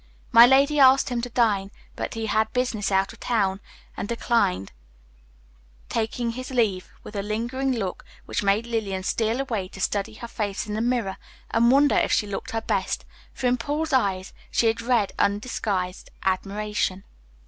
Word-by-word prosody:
My 235 Hz, +1 st, +9 dB
lady 280 Hz, +3 st, +4 dB
asked 270 Hz, 0 st, +6 dB
him 245 Hz, -1 st, -1 dB
to 245 Hz, -, -4 dB
dine, 215 Hz, -5 st, +1 dB, 0.3 s
but -, -, -4 dB
he 225 Hz, 0 st, -3 dB
had 220 Hz, 0 st, +1 dB
business 240 Hz, -5 st, 0 dB
out 195 Hz, 0 st, +1 dB
of -, -, -17 dB
town 195 Hz, -5 st, 0 dB, 0.4 s
and -, -, -4 dB
declined, 230 Hz, -, 0 dB, 1.2 s
taking 230 Hz, +1 st, -1 dB
his 255 Hz, +2 st, -6 dB
leave 215 Hz, -8 st, 0 dB
with 210 Hz, -, -10 dB
a 200 Hz, -, -1 dB
lingering 240 Hz, +6 st, -1 dB
look, 195 Hz, -7 st, -3 dB, 0.2 s
which -, -, -2 dB
made 200 Hz, +3 st, +2 dB
Lillian 210 Hz, -5 st, -2 dB
steal 225 Hz, +5 st, 0 dB
away 225 Hz, -9 st, -2 dB
to 195 Hz, -, -12 dB
study 200 Hz, +2 st, -1 dB
her 235 Hz, -, -8 dB
face 210 Hz, -4 st, -3 dB
in 210 Hz, -, -5 dB
the 215 Hz, -, -1 dB
mirror 235 Hz, -5 st, 0 dB, 0.3 s
and 235 Hz, +1 st, +4 dB
wonder 280 Hz, +2 st, +5 dB
if -, -, +2 dB
she 210 Hz, -, +2 dB
looked 200 Hz, -1 st, -5 dB
her 225 Hz, -, -2 dB
best, -, -, -1 dB, 0.3 s
for 265 Hz, -, -6 dB
in 250 Hz, 0 st, +3 dB
Paul's 295 Hz, +5 st, -2 dB
eyes 195 Hz, -7 st, +1 dB, 0.2 s
she -, -, +1 dB
had 225 Hz, 0 st, +2 dB
read 235 Hz, -4 st, +1 dB
undisguised 200 Hz, -3 st, -1 dB
admiration. 195 Hz, 0 st, -1 dB
225 Hz, 170 wpm, -25 LUFS, 200-245 Hz, 1.2 s, My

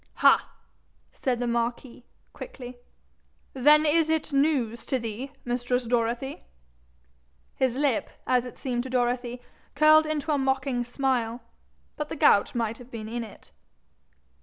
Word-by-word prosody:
'Ha!' -, -, +4 dB, 0.6 s
said 250 Hz, -3 st, -1 dB
the 245 Hz, -, -1 dB
marquis, 235 Hz, +1 st, -3 dB, 0.3 s
quickly; 250 Hz, -, -9 dB, 0.7 s
'then 295 Hz, +4 st, +5 dB
is 315 Hz, +1 st, +3 dB
it 315 Hz, -2 st, -1 dB
news 275 Hz, -6 st, +1 dB
to 265 Hz, -, -1 dB
thee, 230 Hz, +3 st, -5 dB, 0.2 s
mistress 245 Hz, +1 st, -1 dB
Dorothy?' 240 Hz, +3 st, -1 dB, 1.1 s
His 260 Hz, -2 st, 0 dB
lip, 275 Hz, -5 st, 0 dB, 0.2 s
as 250 Hz, -1 st, +2 dB
it 250 Hz, -, -9 dB
seemed 245 Hz, -2 st, -2 dB
to 260 Hz, -, -7 dB
Dorothy, 245 Hz, 0 st, -1 dB, 0.3 s
curled 310 Hz, +1 st, +6 dB
into 310 Hz, 0 st, -2 dB
a 290 Hz, -, +2 dB
mocking 265 Hz, -2 st, 0 dB
smile; 245 Hz, -2 st, -1 dB, 0.6 s
but 300 Hz, 0 st, -4 dB
the -, -, -4 dB
gout 250 Hz, -9 st, +4 dB
might 230 Hz, -1 st, -2 dB
have 245 Hz, 0 st, -13 dB
been 225 Hz, -3 st, -7 dB
in 235 Hz, +1 st, -4 dB
it. 215 Hz, -, -14 dB
250 Hz, 135 wpm, -26 LUFS, 240-280 Hz, 1.1 s, curled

